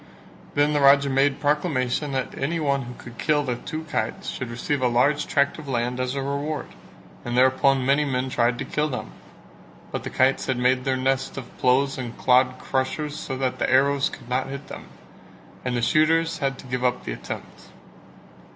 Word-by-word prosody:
Then 145 Hz, +1 st, +3 dB
the 145 Hz, -, +2 dB
Raja 140 Hz, 0 st, +6 dB
made 135 Hz, +1 st, +2 dB
proclamation 145 Hz, -2 st, 0 dB
that 130 Hz, -1 st, -2 dB
any 165 Hz, +5 st, -1 dB
one 140 Hz, -3 st, +1 dB
who 125 Hz, -1 st, -8 dB
could 120 Hz, -1 st, -12 dB
kill 150 Hz, -1 st, +2 dB
the 125 Hz, -3 st, -2 dB
two 155 Hz, +5 st, -6 dB
kites 115 Hz, -8 st, -3 dB
should 130 Hz, -, -5 dB
receive 130 Hz, +4 st, -2 dB
a 125 Hz, -, +3 dB
large 145 Hz, +5 st, +2 dB
tract 140 Hz, +3 st, +1 dB
of 150 Hz, -, -10 dB
land 125 Hz, -1 st, -1 dB
as 130 Hz, +1 st, -1 dB
a 135 Hz, -, -2 dB
reward, 140 Hz, +2 st, -3 dB, 0.5 s
and 120 Hz, 0 st, -2 dB
thereupon 130 Hz, +1 st, +4 dB
many 140 Hz, +3 st, +3 dB
men 130 Hz, -2 st, -1 dB
tried 120 Hz, -1 st, +1 dB
to -, -, -4 dB
kill 150 Hz, 0 st, 0 dB
them; 125 Hz, -, -5 dB, 0.8 s
but -, -, -4 dB
the -, -, -4 dB
kites 130 Hz, +1 st, +2 dB
had 130 Hz, -2 st, 0 dB
made 125 Hz, +1 st, +2 dB
their 130 Hz, -1 st, +1 dB
nest 135 Hz, +1 st, -1 dB
of 130 Hz, -3 st, -8 dB
ploughs 135 Hz, +2 st, +2 dB
and 120 Hz, -2 st, -6 dB
clod 130 Hz, 0 st, +3 dB
crushers 145 Hz, +3 st, -2 dB
so 135 Hz, -3 st, -5 dB
that 130 Hz, -1 st, -1 dB
the -, -, +1 dB
arrows 140 Hz, +2 st, +3 dB
could -, -, -11 dB
not 130 Hz, +2 st, -1 dB
hit 140 Hz, +1 st, -7 dB
them, -, -, -9 dB, 0.8 s
and 125 Hz, -1 st, -1 dB
the 120 Hz, -, -1 dB
shooters 165 Hz, +2 st, +3 dB
had 135 Hz, -2 st, -1 dB
to -, -, -12 dB
give 125 Hz, 0 st, -3 dB
up 125 Hz, -1 st, +1 dB
the -, -, -3 dB
attempt. -, -, -8 dB
135 Hz, 195 wpm, -24 LUFS, 125-145 Hz, 0.8 s, Raja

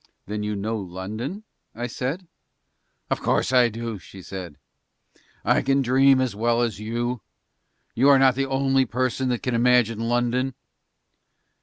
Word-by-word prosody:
"Then 105 Hz, +1 st, -4 dB
you 105 Hz, 0 st, -2 dB
know 110 Hz, +3 st, -2 dB
London?" 105 Hz, -, -6 dB, 0.3 s
I 120 Hz, +2 st, -3 dB
said. 135 Hz, +9 st, -4 dB, 0.8 s
"Of -, -, +1 dB
course -, -, 0 dB
I 125 Hz, -2 st, +5 dB
do," 115 Hz, -1 st, -5 dB
she 95 Hz, +1 st, -13 dB
said. 90 Hz, -6 st, -8 dB, 0.9 s
"I -, -, +3 dB
can 135 Hz, 0 st, +2 dB
dream 135 Hz, +2 st, +4 dB
as 130 Hz, -5 st, -1 dB
well 120 Hz, +2 st, +1 dB
as 110 Hz, -4 st, -2 dB
you. 120 Hz, +2 st, -3 dB, 0.7 s
You 135 Hz, +5 st, +4 dB
are 140 Hz, -, +7 dB
not 135 Hz, -1 st, +5 dB
the 135 Hz, +2 st, -1 dB
only 135 Hz, -1 st, +2 dB
person 130 Hz, +3 st, -1 dB
that 120 Hz, -2 st, -2 dB
can 125 Hz, -, -1 dB
imagine 120 Hz, -2 st, +3 dB
London." 120 Hz, +2 st, 0 dB
120 Hz, 150 wpm, -24 LUFS, 110-130 Hz, 0.9 s, are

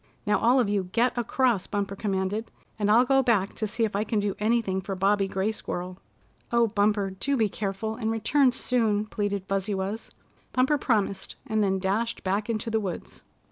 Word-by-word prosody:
"Now 210 Hz, -, +2 dB
all 245 Hz, +3 st, +4 dB
of 240 Hz, -, +2 dB
you 200 Hz, -2 st, 0 dB
get 230 Hz, +7 st, +1 dB
across," 240 Hz, -3 st, +1 dB
Bumper 200 Hz, -1 st, -2 dB
commanded, 200 Hz, +2 st, -2 dB, 0.3 s
"and 205 Hz, -1 st, +1 dB
I'll 235 Hz, +4 st, +6 dB
go 270 Hz, +1 st, +4 dB
back 220 Hz, -6 st, +1 dB
to 215 Hz, -, -3 dB
see 230 Hz, +3 st, -2 dB
if 215 Hz, -2 st, -4 dB
I 205 Hz, -, +1 dB
can 215 Hz, 0 st, -1 dB
do 205 Hz, -1 st, -1 dB
anything 210 Hz, -3 st, +1 dB
for 195 Hz, +1 st, -4 dB
Bobby 195 Hz, +1 st, +2 dB
Gray 195 Hz, +3 st, -1 dB
Squirrel." 180 Hz, -3 st, -5 dB, 0.5 s
"Oh, 235 Hz, 0 st, +4 dB
Bumper, 205 Hz, -1 st, +1 dB
do 270 Hz, +9 st, -1 dB
be 220 Hz, -3 st, +3 dB
careful, 205 Hz, +2 st, -3 dB
and 220 Hz, -2 st, -2 dB
return 255 Hz, +4 st, +3 dB
soon," 225 Hz, -4 st, 0 dB
pleaded 205 Hz, -2 st, -2 dB
Fuzzy 195 Hz, +1 st, -1 dB
Wuzz. 195 Hz, +4 st, -4 dB, 0.4 s
Bumper 265 Hz, +3 st, +2 dB
promised, 210 Hz, -6 st, 0 dB
and 220 Hz, -1 st, +1 dB
then 195 Hz, -1 st, +1 dB
dashed 205 Hz, +5 st, -1 dB
back 200 Hz, +4 st, -1 dB
into 225 Hz, 0 st, -2 dB
the 220 Hz, -, +2 dB
woods. 190 Hz, -5 st, -6 dB
210 Hz, 190 wpm, -26 LUFS, 195-230 Hz, 0.5 s, I'll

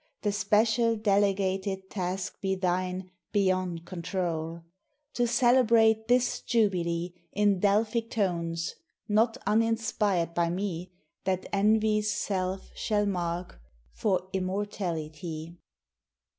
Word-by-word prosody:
The 205 Hz, -, +2 dB
special 220 Hz, +3 st, +2 dB
delegated 195 Hz, -2 st, 0 dB
task 185 Hz, 0 st, -3 dB
be 190 Hz, -1 st, 0 dB
thine, 185 Hz, 0 st, -1 dB, 0.2 s
Beyond 185 Hz, -4 st, 0 dB
control; 170 Hz, -2 st, -3 dB, 0.5 s
To 240 Hz, -1 st, +1 dB
celebrate 230 Hz, -2 st, +4 dB
this 245 Hz, 0 st, +2 dB
Jubilee 175 Hz, -6 st, 0 dB, 0.2 s
In 205 Hz, -2 st, +3 dB
Delphic 220 Hz, +3 st, +2 dB
tones 170 Hz, -6 st, -1 dB, 0.3 s
not 225 Hz, +3 st, +2 dB
uninspired 215 Hz, -5 st, +1 dB
by 170 Hz, 0 st, +1 dB
me, 180 Hz, -1 st, -3 dB, 0.3 s
That 185 Hz, -1 st, 0 dB
envy's 215 Hz, +1 st, +3 dB
self 190 Hz, -2 st, -2 dB
shall 210 Hz, -1 st, 0 dB
mark, 175 Hz, -, -3 dB, 0.3 s
for 185 Hz, -3 st, 0 dB
immortality. 175 Hz, -4 st, -3 dB
195 Hz, 95 wpm, -28 LUFS, 180-215 Hz, 0.5 s, celebrate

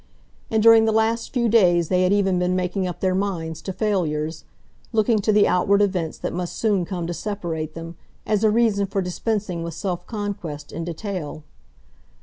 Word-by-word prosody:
And 220 Hz, -1 st, +1 dB
during 225 Hz, -1 st, +7 dB
the 220 Hz, -, +2 dB
last 220 Hz, +1 st, +1 dB
few 235 Hz, -2 st, +1 dB
days 175 Hz, -7 st, +4 dB
they 180 Hz, -1 st, +2 dB
had 185 Hz, +1 st, +3 dB
even 195 Hz, -3 st, +2 dB
been 180 Hz, 0 st, +1 dB
making 185 Hz, +1 st, -1 dB
up 175 Hz, -, -6 dB
their 185 Hz, -1 st, +2 dB
minds 180 Hz, -5 st, -2 dB
to 190 Hz, -, -4 dB
failures, 160 Hz, -7 st, -1 dB, 0.5 s
looking 220 Hz, -1 st, +2 dB
to 215 Hz, +2 st, +1 dB
the 210 Hz, -1 st, +5 dB
outward 200 Hz, +3 st, +3 dB
events 185 Hz, -6 st, 0 dB
that -, -, -4 dB
must 175 Hz, 0 st, -4 dB
soon 205 Hz, -5 st, +1 dB
come 175 Hz, -2 st, -4 dB
to 175 Hz, -, -3 dB
separate 170 Hz, -6 st, -4 dB
them, 165 Hz, 0 st, -8 dB, 0.3 s
as 215 Hz, 0 st, +1 dB
a 220 Hz, -, +5 dB
reason 210 Hz, -3 st, +2 dB
for 195 Hz, 0 st, -1 dB
dispensing 185 Hz, -1 st, -2 dB
with 165 Hz, -1 st, -5 dB
self 180 Hz, -2 st, -4 dB
conquest 190 Hz, -9 st, -5 dB
in 165 Hz, -, -5 dB
detail. 170 Hz, -3 st, -5 dB
190 Hz, 185 wpm, -23 LUFS, 170-210 Hz, 0.5 s, during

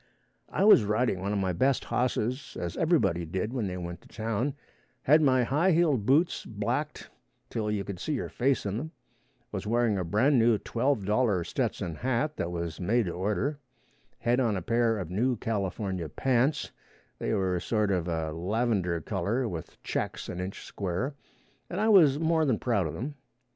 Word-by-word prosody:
I -, -, 0 dB
was 210 Hz, -, +8 dB
riding 105 Hz, -1 st, +1 dB
one 100 Hz, +2 st, -2 dB
of 105 Hz, -, 0 dB
my 95 Hz, -2 st, 0 dB
best 130 Hz, +10 st, +1 dB
hosses, 125 Hz, +1 st, -1 dB
as 85 Hz, -1 st, -4 dB
everybody 155 Hz, -, +2 dB
did 95 Hz, +8 st, -3 dB
when 120 Hz, -6 st, -1 dB
they 90 Hz, -1 st, -4 dB
went 85 Hz, -1 st, -6 dB
to -, -, -18 dB
town; 115 Hz, +5 st, -2 dB, 0.5 s
had 155 Hz, +3 st, +5 dB
my 130 Hz, -4 st, +4 dB
high 155 Hz, +9 st, +2 dB
heeled 150 Hz, -10 st, +2 dB
boots 155 Hz, +7 st, +3 dB
blacked -, -, -3 dB, 0.4 s
till 110 Hz, -2 st, -2 dB
you 105 Hz, -2 st, -1 dB
could 95 Hz, -2 st, -6 dB
see 155 Hz, -, -2 dB
your 135 Hz, -, -2 dB
face 130 Hz, -2 st, 0 dB
in 100 Hz, +1 st, -1 dB
them; 160 Hz, +6 st, -5 dB, 0.6 s
was 100 Hz, 0 st, -4 dB
wearing 115 Hz, -3 st, +2 dB
a -, -, -1 dB
brand 120 Hz, -, +3 dB
new 115 Hz, -1 st, +4 dB
$12 110 Hz, -6 st, +1 dB
Stetson 85 Hz, -, -2 dB
hat 130 Hz, -, 0 dB
that 85 Hz, -, -2 dB
was 85 Hz, -2 st, -4 dB
made 110 Hz, +6 st, +2 dB
to 90 Hz, -, -2 dB
order; 105 Hz, -, -1 dB, 0.6 s
had 120 Hz, +2 st, +1 dB
on 115 Hz, -6 st, +1 dB
a 90 Hz, -, -4 dB
pair 115 Hz, 0 st, +2 dB
of 90 Hz, -4 st, -5 dB
new 120 Hz, +7 st, +1 dB
California 95 Hz, -5 st, -2 dB
pants 130 Hz, -, +1 dB, 0.5 s
they -, -, -2 dB
were 95 Hz, -3 st, 0 dB
sort 105 Hz, +1 st, 0 dB
of 90 Hz, -3 st, 0 dB
a 80 Hz, -2 st, -2 dB
lavender 95 Hz, -1 st, 0 dB
color 105 Hz, -, -1 dB
with 85 Hz, -4 st, -7 dB
checks -, -, -3 dB
an 90 Hz, -, -5 dB
inch 95 Hz, +2 st, -5 dB
square, 100 Hz, +9 st, -3 dB, 0.6 s
and 180 Hz, -, -3 dB
I 220 Hz, +1 st, +2 dB
was 160 Hz, -10 st, +6 dB
more 160 Hz, 0 st, +2 dB
than 130 Hz, -7 st, +2 dB
proud 105 Hz, -8 st, 0 dB
of 75 Hz, -, -6 dB
them. 140 Hz, +5 st, -4 dB
110 Hz, 180 wpm, -28 LUFS, 95-130 Hz, 0.6 s, was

